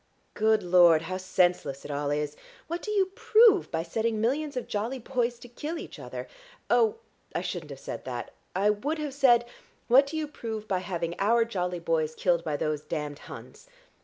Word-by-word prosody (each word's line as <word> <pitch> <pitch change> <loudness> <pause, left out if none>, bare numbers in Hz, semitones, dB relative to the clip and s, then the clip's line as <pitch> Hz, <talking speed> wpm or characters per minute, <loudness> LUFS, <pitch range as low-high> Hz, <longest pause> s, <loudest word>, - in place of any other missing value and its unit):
Good 220 -1 +2
Lord, 175 -3 +6
how 185 +2 -3
senseless 180 -6 0
it - - -5
all 145 0 -1
is! 150 0 -1 0.3
What 340 +2 -4
do - - -6
you 390 -3 +1
prove 435 -3 +5
by 165 -1 -2
setting 220 +5 -1
millions 280 +5 0
of 250 - -3
jolly 225 +6 -2
boys 245 -1 -1
to 245 - -12
kill 295 +7 -5
each - - -8
other? - - -7 0.4
Oh, 450 -1 +4 0.4
I - - 0
shouldn't - - -5
have - - -8
said - - -6
that; - - -5 0.2
I 200 +3 +3
would 285 +10 -2
have 300 -3 -4
said, 245 -4 +5 0.4
'What 270 +4 +6
do 315 - -4
you 310 -1 -2
prove 220 -6 -6
by 190 -3 0
having 170 -2 -3
our 230 +3 +3
jolly 180 -5 -2
boys 160 -2 0
killed 170 -2 +1
by 150 -3 -2
those 150 -1 -1
damned 150 -2 -4
Huns?' - - -11
215 Hz, 190 wpm, -28 LUFS, 170-270 Hz, 0.4 s, Lord